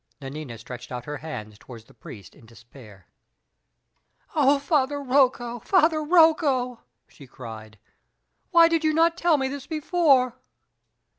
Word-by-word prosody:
Nanina 135 -3 -8
stretched 125 +2 -10
out 125 -1 -6
her 150 0 -6
hands 110 -8 -9
toward 115 -3 -13
the - - -21
priest 105 -3 -13
in 115 - -19
despair. 115 -4 -17 1.3
"Oh, 285 -2 +3
Father 285 -1 0
Rocco! 255 -3 +1
Father 320 - +2
Rocco!" 300 -7 +2 0.3
she 140 - -16
cried, 110 -3 -11 0.7
"why 335 -2 +6
did 330 -1 0
you 310 -1 +1
not 330 +1 +3
tell 345 -3 +2
me 265 -1 -1
this 275 0 -7
before?" 300 -6 +1
255 Hz, 135 wpm, -24 LUFS, -, 1.3 s, why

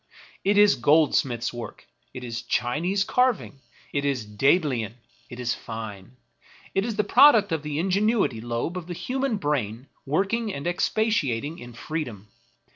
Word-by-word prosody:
It 200 +1 +2
is 205 0 +7
goldsmith's 135 -3 +2
work; 120 -1 -8 0.3
it 125 - -8
is 120 -1 -4
Chinese 170 - 0
carving; 250 - 0 0.3
it 140 - 0
is 135 -6 -1
Daedalian; 120 - +1 0.3
it 120 - -9
is 125 -1 0
fine. 110 0 -8 0.6
It 195 - +1
is 225 -1 -3
the 210 - +1
product 215 -2 +6
of 160 -2 0
the 150 -1 -4
ingenuity 195 - +1
lobe 120 +9 -3
of 175 -2 -7
the 175 - -5
human 255 +5 -1
brain 130 - -2 0.2
working 200 +9 0
and 140 - -6
expatiating 170 - 0
in 120 0 -10
free 155 +6 -4
dom. 105 -4 -11
150 Hz, 150 wpm, -25 LUFS, 120-195 Hz, 0.6 s, is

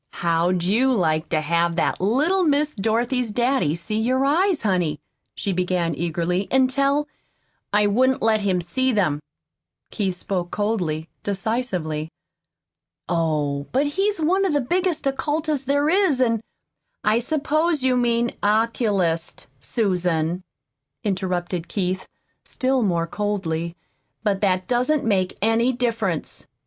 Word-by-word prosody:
"How'd 170 +1 +2
you 230 +9 +3
like 160 -8 +1
to 155 - +1
have 170 +2 +1
that 170 - 0
little 300 - +2
Miss 300 -1 +2
Dorothy's 235 +4 0
daddy 240 - +1
see 215 +6 -3
your 255 +4 +1
eyes, 340 +3 +2
honey," 180 -7 0 0.4
she 200 - -2
began 180 -2 0
eagerly, 175 +3 -1
"an' 260 -1 +3
tell 280 +2 +1 0.3
" - - -45 0.3
"I 210 0 +3
wouldn't 255 +6 +2
let 220 -1 +3
him 190 -3 +1
see 260 +10 0
them." 175 -10 +1 0.7
Keith 195 -4 -1
spoke 180 -1 -3
coldly, 180 -8 -1
decisively. 190 -7 -2 1.0
"Oh, 150 -4 0
but 270 +3 +2
he's 390 +6 0
one 360 +5 +2
of 380 - +1
the 290 - +3
biggest 345 +4 0
occultists 290 +1 -1
there 285 +1 +2
is, 360 -5 +3
an' 230 -4 +2 0.3
" - - -58 0.3
"I 215 +2 +3
suppose 310 +3 0
you 260 -1 +3
mean 240 -1 +1
'oculist,' 205 -6 0
Susan," 175 - 0 0.6
interrupted 180 -3 -2
Keith, 185 0 -2 0.4
still 260 0 0
more 170 -6 +1
coldly; 170 -4 -2 0.5
"but 200 -2 0
that 185 -2 +1
doesn't 250 +4 +1
make 190 -4 +1
any 225 +3 +3
difference. 230 -9 -2
210 Hz, 135 wpm, -23 LUFS, 175-260 Hz, 1.0 s, you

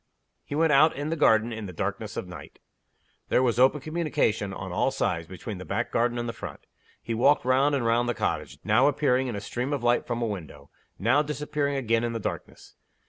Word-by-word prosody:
He 145 - -6
went 160 0 +3
out 155 +3 +5
in 145 +3 -3
the - - +1
garden 115 -5 +3
in 110 -2 -6
the - - -7
darkness 85 - -4
of - - -3
the - - -10
night. - - -12 0.7
There 130 - +3
was 120 -2 +1
open 135 +3 +4
communication, 155 -10 -1
on - - -6
all - - +1
sides, 80 -1 -2
between 95 +2 -7
the - - -6
back 115 +6 -2
garden 120 +1 +1
and 120 0 -2
the 115 - -3
front. 100 -9 -9 0.4
He 115 - -3
walked 130 +4 +3
round 135 +3 +3
and 130 -4 -1
round 120 +1 +2
the 120 - -1
cottage - - -2
now 110 +6 +4
appearing 130 -3 +2
in 120 - -3
a 100 - -4
stream 125 +6 -3
of 140 -4 -2
light 120 0 +2
from 120 -1 -2
a 120 - 0
window; 80 -9 -7 0.3
now 120 +8 +3
disappearing 150 -1 -2
again 115 -3 +1
in 120 0 -1
the 115 - -3
darkness. - - -6
120 Hz, 225 wpm, -26 LUFS, 110-140 Hz, 0.7 s, out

